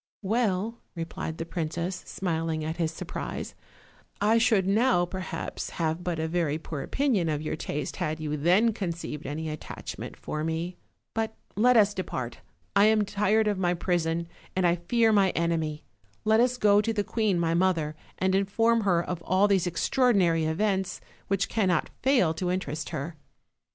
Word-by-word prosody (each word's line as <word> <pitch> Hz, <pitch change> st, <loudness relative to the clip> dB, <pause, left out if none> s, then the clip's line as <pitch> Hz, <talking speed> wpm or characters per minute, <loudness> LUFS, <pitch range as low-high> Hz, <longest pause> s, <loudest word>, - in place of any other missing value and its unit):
"Well,'* 220 Hz, +1 st, 0 dB, 0.2 s
replied 165 Hz, -1 st, -4 dB
the 165 Hz, -, -4 dB
princess, 170 Hz, +2 st, -3 dB
smiling 165 Hz, -3 st, -2 dB
at 160 Hz, +1 st, -3 dB
his 165 Hz, -2 st, 0 dB
surprise, 160 Hz, -, -5 dB, 0.7 s
"I 220 Hz, +3 st, +4 dB
should 225 Hz, -5 st, +3 dB
now, 195 Hz, -3 st, +3 dB
perhaps, 185 Hz, +1 st, -5 dB
have 165 Hz, +1 st, -1 dB
but 175 Hz, -2 st, -2 dB
a 160 Hz, 0 st, -1 dB
very 160 Hz, -3 st, 0 dB
poor 155 Hz, -3 st, -6 dB
opinion 220 Hz, -, +1 dB
of 150 Hz, 0 st, -1 dB
your 155 Hz, -, -2 dB
taste 150 Hz, -1 st, -4 dB
had 155 Hz, +1 st, -2 dB
you 150 Hz, -1 st, -2 dB
then 185 Hz, +10 st, +3 dB
conceived 170 Hz, -, -4 dB
any 155 Hz, +3 st, -3 dB
attachment 155 Hz, -1 st, -7 dB
for 155 Hz, -, -4 dB
me; 165 Hz, +3 st, -2 dB, 0.4 s
but 220 Hz, 0 st, -2 dB, 0.2 s
let 245 Hz, +3 st, +5 dB
us 210 Hz, -1 st, +5 dB
depart; 130 Hz, -11 st, -4 dB, 0.4 s
I 200 Hz, -, +6 dB
am 215 Hz, -1 st, +4 dB
tired 210 Hz, +2 st, +2 dB
of 205 Hz, -2 st, 0 dB
my 175 Hz, -1 st, +2 dB
prison, 170 Hz, -1 st, 0 dB, 0.3 s
and 185 Hz, -1 st, +2 dB
I 175 Hz, 0 st, +3 dB
fear 225 Hz, +6 st, +2 dB
my 195 Hz, -2 st, +5 dB
enemy; 160 Hz, -2 st, -1 dB, 0.4 s
let 220 Hz, +1 st, +4 dB
us 250 Hz, +1 st, +3 dB
go 205 Hz, -3 st, +5 dB
to 225 Hz, -, -1 dB
the 210 Hz, -2 st, 0 dB
queen 210 Hz, -5 st, 0 dB
my 165 Hz, -1 st, +1 dB
mother, 170 Hz, -4 st, +1 dB, 0.2 s
and 190 Hz, 0 st, +1 dB
inform 225 Hz, +4 st, +2 dB
her 180 Hz, -4 st, +2 dB
of 175 Hz, -1 st, -4 dB
all 185 Hz, +4 st, +3 dB
these 190 Hz, -3 st, +2 dB
extraordinary 180 Hz, -4 st, +2 dB
events, 190 Hz, +3 st, 0 dB, 0.3 s
which 195 Hz, 0 st, +1 dB
can 220 Hz, -4 st, +1 dB
not 180 Hz, -, +1 dB
fail 250 Hz, -, +3 dB
to 180 Hz, +2 st, -2 dB
interest 155 Hz, -5 st, -2 dB
her." 155 Hz, +3 st, -5 dB
180 Hz, 170 wpm, -27 LUFS, 160-210 Hz, 0.7 s, I